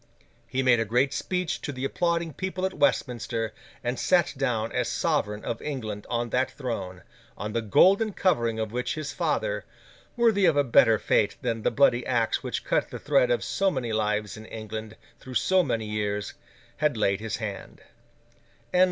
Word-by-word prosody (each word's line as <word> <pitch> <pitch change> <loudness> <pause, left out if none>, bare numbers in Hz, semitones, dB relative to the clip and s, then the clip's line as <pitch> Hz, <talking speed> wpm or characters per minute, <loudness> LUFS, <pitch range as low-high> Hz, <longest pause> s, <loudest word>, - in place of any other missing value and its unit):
He 130 +1 -1
made 125 -2 +5
a - - +2
great 125 +6 +1
speech 180 -3 -2
to - - -4
the 130 -1 -4
applauding 170 +1 0
people 185 +1 -3
at 190 - -2
Westminster, 120 -6 0 0.3
and 120 +1 -2
sat 180 -3 +3
down 120 -5 -1
as 125 -1 -1
sovereign 110 -11 -1
of 115 - -3
England 110 -8 -5
on 120 -1 -1
that 130 +1 +1
throne, 115 -9 -5 0.3
on 105 +2 -4
the 115 - 0
golden 195 - +4
covering 120 - +1
of 110 -1 -2
which 125 +1 -2
his 155 -2 -4
father—worthy 235 - -1
of 160 -3 +3
a 145 - +5
better 115 -3 +5
fate 105 0 +1
than 115 -2 -1
the - - +2
bloody 125 -3 +3
axe 120 -3 0
which - - -3
cut - - +1
the - - -6
thread - - +2
of - - +1
so 195 0 +1
many 125 -9 -3
lives 105 -1 0
in 110 0 -10
England, 110 0 -7 0.2
through 130 -1 -10
so 190 +7 +4
many 115 -10 -1
years—had 105 +6 -3
laid 100 -2 +1
his 110 0 -3
hand. 105 -3 -6
120 Hz, 170 wpm, -26 LUFS, 110-155 Hz, 0.3 s, made